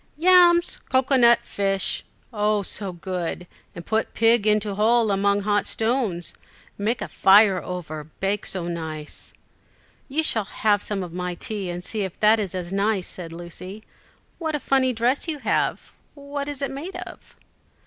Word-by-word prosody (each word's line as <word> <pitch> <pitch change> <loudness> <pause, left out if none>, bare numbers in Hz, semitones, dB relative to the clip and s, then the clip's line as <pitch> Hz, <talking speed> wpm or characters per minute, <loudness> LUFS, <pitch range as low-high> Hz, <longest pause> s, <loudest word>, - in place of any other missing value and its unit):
"Yams, 345 0 +5
cocoa 265 +1 +2
nut, 235 -2 +6
fish 195 -2 -1 0.3
oh, 210 -1 +1
so 195 0 -2
good, 180 -1 -4 0.3
and 170 - -8
put 220 0 -1
pig 225 -1 +3
into 210 -1 +2
hole 220 +2 +3
among 200 +1 +2
hot 205 0 +1
stones, 220 -7 0 0.4
make 220 +4 -1
a - - -5
fire 195 -1 +5
over, 155 -4 -6
bake 195 +1 -1
so 180 -3 -3
nice!" 160 -3 -6 0.8
"You 310 +4 +1
shall 220 -9 +1
have 205 0 +1
some 200 -3 -3
of 175 -2 -8
my 180 0 -3
tea 200 0 -5
and 175 0 -5
see 215 +3 -3
if 190 -3 -5
that 215 +1 +5
is 195 -3 -3
as 180 0 -5
nice," 200 -1 0
said 170 -3 -7
Lucy. 180 +5 -9 0.6
"What 320 -3 -2
a - - -1
funny 265 -1 +2
dress 245 +7 0
you 315 -2 -1
have; - - -1 0.2
what 285 0 -5
is 285 -1 -5
it 275 - -2
made 315 +8 -7
of?" - - -10
210 Hz, 165 wpm, -23 LUFS, 185-240 Hz, 0.8 s, nut